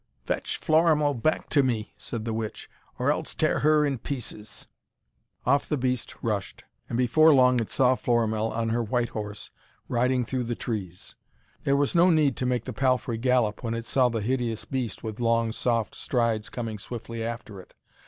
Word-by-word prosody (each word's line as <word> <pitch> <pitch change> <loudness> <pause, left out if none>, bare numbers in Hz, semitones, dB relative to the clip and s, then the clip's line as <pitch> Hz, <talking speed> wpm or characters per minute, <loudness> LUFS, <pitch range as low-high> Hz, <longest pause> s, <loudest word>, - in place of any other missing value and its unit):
'Fetch - - -2
Florimell 155 -2 +3
back 140 +5 0
to 145 - +3
me!' 115 -5 -1
said 115 -2 -6
the 115 - -2
witch, 110 -1 -4 0.3
'or - - +2
else - - -3
tear - - +1
her 150 0 +4
in 135 -4 -1
pieces!' 110 -5 -6 0.8
Off 140 +3 +2
the 150 - +1
beast 125 -2 -2
rushed, 105 -4 -3 0.3
and 115 - -2
before 140 +6 +5
long 125 -3 +5
it 115 - -3
saw 130 -1 +3
Florimell 115 -3 +1
on 115 0 -2
her 120 +1 +1
white 120 +1 0
horse 105 -1 -6 0.4
riding 125 0 +1
through 125 +1 -2
the 120 0 -2
trees. 95 -8 -5 0.5
There 140 0 +3
was 145 -1 +1
no 175 +1 +5
need 155 -6 +3
to 125 - -1
make 125 -2 0
the 130 - -5
palfrey 125 -1 0
gallop 125 -4 +1
when 115 -2 -2
it 115 0 -5
saw 125 -1 +3
the 115 -2 -2
hideous 120 -1 -1
beast 125 -6 -4
with 110 -1 -5
long, 115 -1 +2
soft 115 -1 -1
strides 115 -3 -1
coming 115 -3 -5
swiftly 115 +1 -6
after 115 -4 -6
it. - - -21
120 Hz, 185 wpm, -26 LUFS, 115-130 Hz, 0.8 s, before